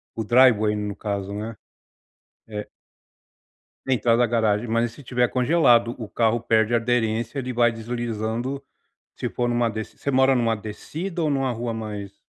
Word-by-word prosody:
O 110 - -2
driveway 110 -3 +4
no 105 -1 -3
caso 100 -1 -4
né? 110 +2 -5 0.9
É 105 -1 -6 1.2
Entrada 120 -2 +2
da 120 - +4
garagem 110 -1 +1
mas 115 +1 +1
se 140 - -13
tiver 125 -1 +1
congelado 125 -3 +3
o 110 -3 -6
carro 115 0 +1
perde 110 0 +2
aderência 115 +1 0
ele 130 -1 -3
vai 120 -1 +3
deslizando 115 +3 -3 0.5
se - - -3
for 120 - -1
numa 120 -1 +1
deci 110 -1 -6
você 140 - -3
mora 130 0 +4
numa 115 -2 +2
descida 160 - -5
ou 150 - +1
numa 135 -2 0
rua 115 0 -3
mais 105 -3 -6
115 Hz, 155 wpm, -24 LUFS, 110-125 Hz, 1.2 s, driveway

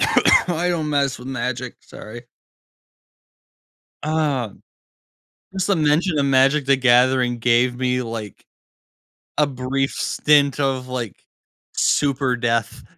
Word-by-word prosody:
I 175 0 +2
don't 160 -4 -2
mess 140 -2 0
with 125 +2 -10
Magic, 125 -1 -4
sorry. 115 +2 -11 1.8
Uh, 150 -7 -1 1.0
just 190 -1 -2
the 200 -3 +1
mention 155 +2 +1
of 140 - +1
Magic: 135 +2 +3
The 135 0 +4
Gathering 125 -1 +3
gave 120 +1 +2
me, 125 0 -1
like, 115 -4 -8 0.9
a 150 - +3
brief 135 +1 -2
stint 145 -2 +1
of, 130 -2 -1
like, 120 -6 -5 0.6
super 135 -3 +1
death. 115 -2 -2
130 Hz, 110 wpm, -21 LUFS, 125-145 Hz, 1.8 s, The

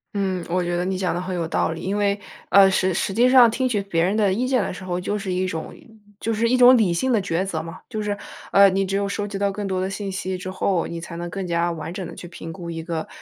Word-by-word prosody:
嗯， 190 -3 -1
我 180 +2 +1
觉 175 0 -1
得 175 - 0
你 190 +1 -1
讲 185 -2 -1
得 175 - -2
很 185 0 -4
有 170 -2 -2
道 165 - 0
理。 165 - -6
因 195 +2 -2
为， 205 0 +1 0.3
呃， 195 -1 +7
实 190 -1 +1
实 195 - -1
际 240 +5 +4
上 250 -2 +8
听 255 +3 0
取 210 -4 0
别 170 -4 0
人 195 +4 +1
的 205 -3 +3
意 240 +6 0
见 255 -2 +2
的 190 - -3
时 190 - -9
候， 180 -1 -2
就 205 +3 -2
是 195 -2 -4
一 185 +1 0
种 165 -3 -5 0.5
就 225 - -1
是 230 +2 +1
一 255 - +3
种 250 0 +8
理 200 -7 +2
性 255 +9 +1
的 220 - +3
抉 185 -1 -1
择 165 -5 -3
嘛。 165 +3 -9
就 220 -4 -4
是， 205 -1 -2 0.3
呃， 200 0 +7
你 195 +1 0
只 195 +1 -1
有 200 0 0
收 205 +1 -2
集 205 -1 -5
到 200 0 +1
更 205 0 -4
多 190 -1 -1
的 190 +1 -1
信 195 0 -4
息 190 0 -3
之 185 +1 -6
后， 185 -2 0
你 170 - -5
才 170 0 -8
能 175 +1 -5
更 190 +2 -4
加 170 0 +1
完 165 0 -6
整 190 0 -5
地 - - -8
去 175 - -9
评 165 -1 -8
估 170 0 -8
一 165 -1 -5
个 165 -1 -4
190 Hz, 320 characters per minute, -23 LUFS, 175-205 Hz, 0.5 s, 上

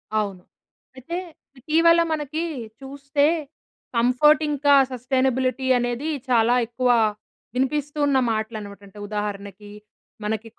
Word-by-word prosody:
అవును. 200 -4 -2 0.5
అయితే 295 +7 -6 0.4
ఇటీవల 335 +4 +4
మనకి 310 +2 -3 0.4
చూస్తే 280 +1 -1 0.7
కంఫర్ట్ 255 +6 +4
ఇంకా, 285 0 +3 0.2
సస్టెయినబిలిటీ 260 +1 0
అనేది 245 +5 -2 0.2
చాలా 240 0 +4
ఎక్కువ 250 +1 -1 0.7
వినిపిస్తూ 290 +3 -1
ఉన్న 275 -2 +3
మాటలనమాట. 215 -2 -4
అంటే 205 +2 -14
ఉదాహరణకి 205 -1 -5 0.5
మనకి, 220 +1 -3
255 Hz, 95 wpm, -23 LUFS, 220-285 Hz, 0.7 s, ఇటీవల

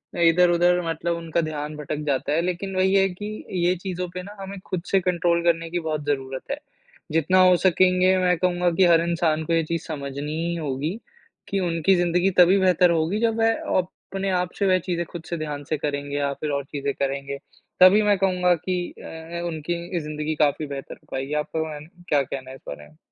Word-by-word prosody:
अ, - - -4
इधर-उधर 175 +1 +4
मतलब 170 +1 -1
उनका 165 0 -1
ध्यान 150 -1 -4
भटक 150 0 -4
जाता 140 +1 0
है, 165 - +2
लेकिन 185 +2 -3
वही 190 +1 +2
है 195 0 +5
कि 210 +4 -7 0.2
ये 180 +1 +3
चीज़ों 180 0 -4
पे 180 - -4
ना 205 +2 -10
हमें 195 0 -7
खुद 180 -2 -3
से 195 - +5
कंट्रोल 175 -1 +1
करने 165 -1 +1
की 175 +1 -1
बहुत 155 -2 -3
ज़रूरत 135 - -3
है। 280 - -1 0.5
जितना 165 +4 +3
हो 180 -1 +6
सकेंगे 185 +1 +4
मैं 180 -1 +2
कहूँगा 180 0 +1
कि 190 0 +5
हर 170 -1 +5
इंसान 165 -2 0
को 165 - -1
ये 165 - +3
चीज़ 165 +1 -2
समझनी 140 -1 -5
ही 170 0 -1
होगी 150 0 -2 0.6
कि 195 - -1
उनकी 170 +1 +2
ज़िंदगी 175 +1 +2
तभी 180 +2 +7
बेहतर 180 -1 +4
होगी, 165 +5 +1
जब 230 0 +1
वह 225 0 +4 0.2
अपने 195 +1 -3
आप 180 0 -2
से 200 - +2
वह 185 0 +4
चीज़ें 175 -1 -2
खुद 170 0 -9
से 170 - -2
ध्यान 150 -2 -4
से 155 - 0
करेंगे, 145 -1 -3
या 140 -1 0
फिर 150 +2 -4
और 140 0 -1
चीज़ें 140 0 -3
करेंगे, 140 0 -3 0.4
तभी 185 +3 +8
मैं 205 -1 +3
कहूँगा 180 -2 +2
कि 180 +2 -2 0.2
अ - - -10
अ, 165 +1 -7
उनकी 170 +2 -3
ज़िंदगी 150 0 -3
काफ़ी 150 0 +1
बेहतर 140 -1 -7
हो - - -28
पाएगी। 135 +2 -3
आपका 160 - -4
वान 150 0 -8 0.2
क्या 145 -2 +4
कहना 130 0 -6
है 130 - -8
इस - - -16
बारे 75 +1 -8
में? 75 +1 -23
170 Hz, 215 wpm, -24 LUFS, 150-180 Hz, 0.6 s, तभी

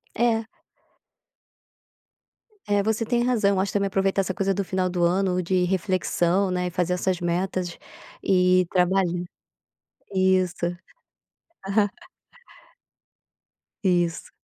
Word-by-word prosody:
É. 230 -1 +1 2.2
É, 205 -1 +2
você 220 +2 0
tem 240 +1 +1
razão. 235 -5 +2
Eu 190 - +1
acho 195 +1 -1
também 200 -1 +1
aproveitar 195 0 +1
essa 190 -1 -2
coisa 195 +1 0
do 200 - -1
final 185 0 -1
do 175 -1 -2
ano 180 +1 +1
de 180 +1 +1
reflexão, 185 0 +1
né, 180 0 -1
e - - -3
fazer 180 0 0
essas 180 0 -1
metas 175 0 -2 0.4
e 185 -1 +3
trabalhar. 180 -1 +1 0.9
Isso. 185 -2 +2 1.0
Aham. 205 +1 +2 2.0
Isso. 175 -3 0
185 Hz, 110 wpm, -24 LUFS, 180-195 Hz, 2.2 s, e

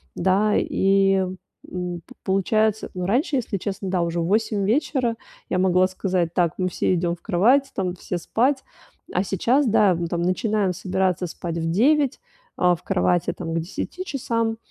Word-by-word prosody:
да. 195 +4 +2
И, 195 0 +3 0.5
м, 180 -1 -4
п - - -15
получается, 215 +3 +1
ну, 180 -1 -3
раньше, 265 - +1
если 220 -4 -2
честно, 195 0 -4
да, 180 -2 +1
уже 170 0 -1
в - - -1
8 210 +1 +1
вечера 245 0 +1 0.3
я - - 0
могла 185 0 +4
сказать: 185 -3 -1
"Так, 175 -3 +2
мы 185 -1 0
всё 185 - 0
идём 170 0 0
в - - -26
кровать, 255 +10 +3
там, 185 -3 -1
все 180 0 -4
спать". 265 - 0 0.5
А 180 - +1
сейчас, 240 - +1
да, 205 -4 +4
мы 170 0 -2
там 170 0 -2
начинаем 195 +1 0
собираться 185 -1 -1
спать 170 0 -5
в 165 0 -1
9, 275 - +2 0.4
а, 180 -1 +4
в 170 - -15
кровати, 180 -2 +1
там, 165 -2 -4
к 165 - 0
10 200 - -5
часам, 230 -7 -2
190 Hz, 175 wpm, -23 LUFS, 180-220 Hz, 0.5 s, могла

